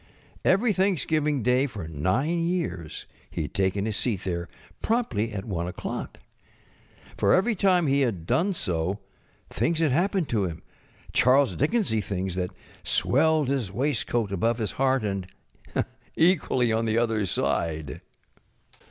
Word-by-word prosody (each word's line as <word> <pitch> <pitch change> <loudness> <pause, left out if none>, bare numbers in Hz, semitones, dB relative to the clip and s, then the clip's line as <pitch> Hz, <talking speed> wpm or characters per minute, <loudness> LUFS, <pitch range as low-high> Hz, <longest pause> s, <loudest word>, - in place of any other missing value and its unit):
Every 210 +4 +3
Thanksgiving 155 - +1
Day 125 +4 +3
for 105 - -7
nine 115 - 0
years 170 - -3 0.2
he - - -3
had 75 - -7
taken 100 +1 0
his 110 -2 -1
seat 100 -4 -1
there 85 -2 -3 0.3
promptly 125 - 0
at 100 -2 -5
1 85 -5 -2
oŌĆÖclock. - - -5 1.0
For - - +4
every 205 +6 +2
time 185 -3 +3
he 140 0 +2
had 100 -11 -1
done 190 - +1
so 90 - -1 0.5
things 165 0 0
had 160 -3 +2
happened 175 +3 +1
to 105 -4 +1
him 85 -2 -6
ŌĆö - - -25
Charles 130 +2 +4
Dickensy 150 - +1
things 95 -1 -3
that 90 0 -2 0.3
swelled 160 -4 +2
his 130 -8 -1
waistcoat 120 -4 0
above 115 +5 +1
his 110 -4 -2
heart, 135 -2 +1
and 100 -3 -2 0.9
equally 145 -9 +3
on 115 +1 +1
the 110 0 +1
other 115 -2 +1
side. 80 -2 -1
120 Hz, 145 wpm, -26 LUFS, 95-160 Hz, 1.0 s, For